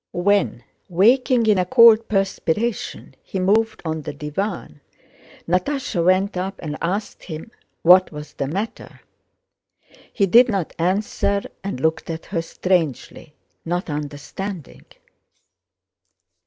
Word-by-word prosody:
When, 190 - +1 0.3
waking 235 +6 +3
in 210 -3 +3
a 180 - +1
cold 230 +1 +6
perspiration, 195 +2 -2
he 190 - -5
moved 215 +4 +1
on 160 -1 -2
the - - -6
divan, 150 - -5 0.7
Natásha 185 - -1
went 185 +3 +2
up 190 +2 -3
and 150 -3 -5
asked 200 +5 -3
him 160 +6 -8 0.3
what 185 +2 +6
was 150 -1 -9
the 140 - -3
matter. 200 +9 -5 1.1
He 200 - +1
did 240 +6 +6
not 195 -6 -2
answer 200 +2 0 0.2
and 195 -10 -4
looked 160 +4 -1
at 165 0 -5
her 170 -4 -2
strangely, 165 -4 -2 0.3
not 175 0 -3
understanding. 150 +4 -6
185 Hz, 115 wpm, -21 LUFS, 160-205 Hz, 1.1 s, cold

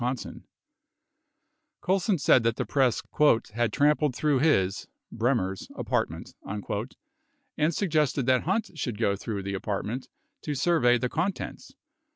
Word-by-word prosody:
70 125 0 -4 1.3
Colson 190 +1 +1
said 135 -3 +4
that 115 0 +1
the - - -2
press 135 -5 +1 0.5
"had 120 -1 0
trampled 150 0 +2
through 145 -2 +2
his 100 -10 +2 0.2
(Bremer's) 110 -6 -1
apartment," - - -2
71 105 +2 -4 0.7
and 155 +2 +2
suggested 150 - +1
that 130 -1 +2
Hunt 195 +6 0
should 125 -8 -4
go 100 -3 +1
through 100 -1 -5
the 100 +1 -4
apart 100 +1 -3
ment 125 +5 -5 0.3
to 150 - -3
survey 140 -5 +3
the 125 - -1
contents. 190 - -4
125 Hz, 135 wpm, -27 LUFS, 110-155 Hz, 1.3 s, said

